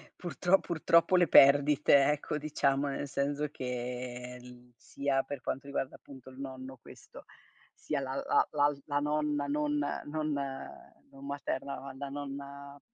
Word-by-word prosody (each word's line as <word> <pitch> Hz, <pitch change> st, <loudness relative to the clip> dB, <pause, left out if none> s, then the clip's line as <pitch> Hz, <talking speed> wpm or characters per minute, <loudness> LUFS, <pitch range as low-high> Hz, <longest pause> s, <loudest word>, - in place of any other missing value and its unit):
purtro 180 Hz, +1 st, +1 dB
purtroppo 170 Hz, +2 st, +3 dB
le 175 Hz, -1 st, +5 dB
perdite, 145 Hz, 0 st, +6 dB
ecco, 150 Hz, 0 st, -2 dB
diciamo, 145 Hz, -2 st, 0 dB
nel 140 Hz, +1 st, -3 dB
senso 145 Hz, +2 st, -1 dB
che 125 Hz, -1 st, -5 dB
l 125 Hz, 0 st, -15 dB
sia 140 Hz, -1 st, -1 dB
per 145 Hz, -3 st, -6 dB
quanto 135 Hz, +1 st, -4 dB
riguarda 135 Hz, -1 st, -3 dB
appunto 130 Hz, -2 st, -13 dB
il 130 Hz, -, -14 dB
nonno 130 Hz, -1 st, -7 dB
questo, -, -, -14 dB, 0.5 s
sia 150 Hz, -2 st, -3 dB
la 130 Hz, -1 st, -4 dB
la -, -, +3 dB
l'al 145 Hz, -1 st, +1 dB
la 145 Hz, -1 st, 0 dB
nonna 150 Hz, -1 st, 0 dB
non 150 Hz, +1 st, 0 dB, 0.3 s
non 155 Hz, 0 st, -2 dB, 0.8 s
non 135 Hz, 0 st, -13 dB
materna, 140 Hz, -1 st, -4 dB
ma 135 Hz, +1 st, -8 dB
la 140 Hz, +1 st, -6 dB
nonna 140 Hz, 0 st, -7 dB
140 Hz, 145 wpm, -31 LUFS, 135-150 Hz, 0.8 s, perdite